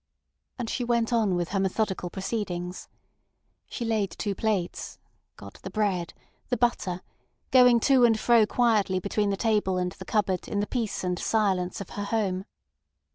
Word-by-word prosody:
And 245 -3 -3
she 245 - -2
went 235 -1 +1
on 215 -5 +2
with 175 -1 -1
her 195 - -1
methodical 190 -1 -1
proceedings. 185 -3 -4 0.8
She 235 - -5
laid 215 -4 0
two 205 -2 -3
plates, 195 -3 -2 0.4
got 100 0 -12
the - - -6
bread, 190 -4 -1 0.3
the 245 - +1
butter, 205 -6 0 0.5
going 250 -2 +7
to 265 -1 +4
and 225 -2 +4
fro 230 -2 +4
quietly 210 -5 +2
between 205 +2 0
the 195 - -1
table 210 -4 +1
and 180 0 -1
the - - -11
cupboard 195 -4 0
in 205 - -2
the 205 - +1
peace 225 -4 -3
and 180 -1 -1
silence 190 -4 0
of 195 - -8
her 205 - -4
home. 195 -4 -1
205 Hz, 165 wpm, -27 LUFS, 185-225 Hz, 0.8 s, going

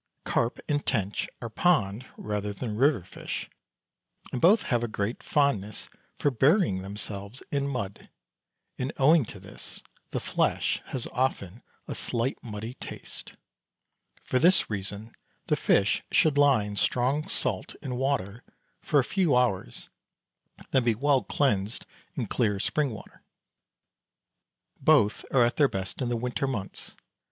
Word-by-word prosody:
Carp 115 +1 0
and 145 -1 0
tench 105 -5 -1
are 115 - -3
pond 120 - +2
rather 105 -1 -3
than 110 +1 -4
river 130 - +3
fish, - - -6 0.8
and 125 - -3
both 200 +6 +6
have 120 -2 0
a - - 0
great 110 +1 -3
fondness 110 -9 0 0.3
for 145 - +2
burying 135 - +3
themselves 100 +3 -6
in 140 -1 0
mud, 100 -8 -4 0.7
and 130 +3 -1
owing 150 +3 +6
to - - -10
this - - -9 0.3
the - - -2
flesh - - 0
has 130 - -4
often 120 -5 -1 0.3
a - - -3
slight 120 +3 -2
muddy 110 0 -6
taste; - - -9 0.9
for 130 - +1
this 175 -5 +4
reason 105 +2 -5 0.3
the - - +2
fish - - +2
should 155 -3 +4
lie 140 -6 +5
in 105 0 -5
strong 130 +8 +1
salt - - -1
and 130 -4 -3
water 125 -4 -1 0.4
for 150 - +3
a - - +4
few 175 -2 +2
hours, 110 - 0 0.8
then 130 -2 +3
be 120 -2 +2
well 140 +2 +3
cleansed 110 -6 0 0.3
in 130 -7 -1
clear 105 -2 0
spring 150 +6 0
water. 110 -4 -10 1.6
Both 105 - +4
are 125 -3 +5
at 120 - -1
their 145 -3 +5
best 95 +6 -4
in 125 - 0
the 120 - 0
winter 125 +3 -1
months. 105 -8 -5
120 Hz, 145 wpm, -28 LUFS, 105-140 Hz, 1.6 s, both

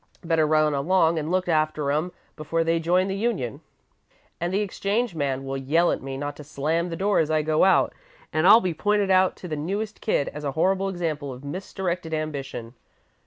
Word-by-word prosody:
Better 165 -2 +2
run 155 -1 +3
along 165 +3 +2
and 155 +1 -4
look 185 0 0
after 155 -3 +1
'em 155 +5 -1 0.2
before 165 +2 -1
they 165 0 +1
join 180 +3 +2
the 195 - -2
union.' 195 - -2 0.8
"And 175 +1 -2
the 195 +2 +1
exchange 205 +2 -1
man 135 -4 -2
will 135 0 -3
yell 155 +6 +2
at - - -2
me 135 0 -5
not 145 +1 -4
to 150 - -9
slam 155 +5 -1
the 165 - -4
door 200 +4 +1
as 160 - +1
I 155 -1 +2
go 155 0 +2
out, 190 - +4 0.4
and 155 +3 +3
I'll 220 +3 +9
be 180 -2 -1
pointed 205 +3 +1
out 185 0 +4
to 180 - -9
the 155 - -3
newest 200 +8 -4
kid 175 -9 +1
as 150 - -8
a 140 -2 -2
horrible 190 +5 +1
example 160 -6 -3
of 125 +1 -10
misdirected 180 0 -3
ambition. 135 -6 -5
165 Hz, 205 wpm, -25 LUFS, 150-185 Hz, 0.8 s, I'll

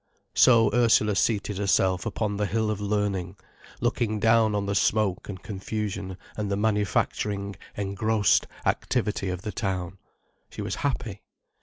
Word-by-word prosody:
So 115 -4 +6
Ursula 110 -3 +4
seated 105 0 0
herself 95 0 +2
upon 105 -1 -2
the 105 0 0
hill 110 +2 0
of 105 -1 -4
learning, 100 -3 -1 0.5
looking 120 -3 0
down 110 -1 +4
on 100 -1 -1
the 100 - -1
smoke 100 -1 +1
and 95 -3 -7
confusion 100 -2 -4 0.2
and 105 -2 -3
the 100 - 0
manufacturing, 100 -1 0 0.2
engrossed 105 +1 +2 0.2
activity 100 -2 0
of 90 0 -4
the 105 - -3
town. 95 -3 -3 0.5
She - - -6
was - - -3
happy. 120 -7 -2
105 Hz, 140 wpm, -26 LUFS, 95-110 Hz, 0.5 s, So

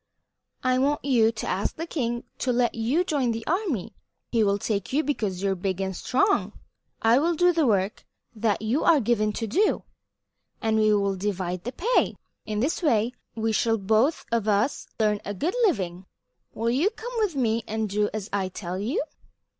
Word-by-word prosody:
I 255 0 +2
want 285 +2 +1
you 235 -5 +4
to 220 - -6
ask 190 +2 -1
the 330 - -4
king 240 -8 -2 0.2
to 250 - 0
let 240 -1 +2
you 245 +10 +1
join 275 -9 0
the 225 0 -5
army. 335 - -1 0.4
He 230 -2 +3
will 200 -1 +2
take 200 -1 -2
you 295 +4 +2
because 210 -10 -2
you 195 - +2
are - - 0
big 190 0 -2
and 190 -1 -2
strong. 390 - +1 0.5
I 230 +3 +5
will 335 +3 +1
do 355 +2 +4
the 320 -4 +2
work 200 -2 +1 0.3
that 215 -1 0
you 235 +8 +1
are 330 -3 +5
given 215 -3 +1
to 225 - -3
do, 385 - +1 0.8
and 220 -1 +1
we 215 0 +4
will 200 -1 +1
divide 185 -2 -3
the 245 - -2
pay. 445 - +1 0.3
In 210 0 -1
this 290 +9 0
way 240 -7 +2 0.2
we 225 0 0
shall 225 +1 +2
both 220 +9 +2
of 230 -2 0
us 210 +6 +1
earn 210 -2 +2
a 205 - -4
good 330 - -1
living. 185 - -2 0.4
Will 230 +2 -1
you 295 +11 +3
come 480 +2 -8
with 410 -8 0
me 230 -3 +1
and 220 0 -1
do 210 +1 0
as 215 -2 -4
I 195 -2 0
tell 180 -1 -5
you?" 260 - -1
225 Hz, 195 wpm, -26 LUFS, 205-275 Hz, 0.8 s, I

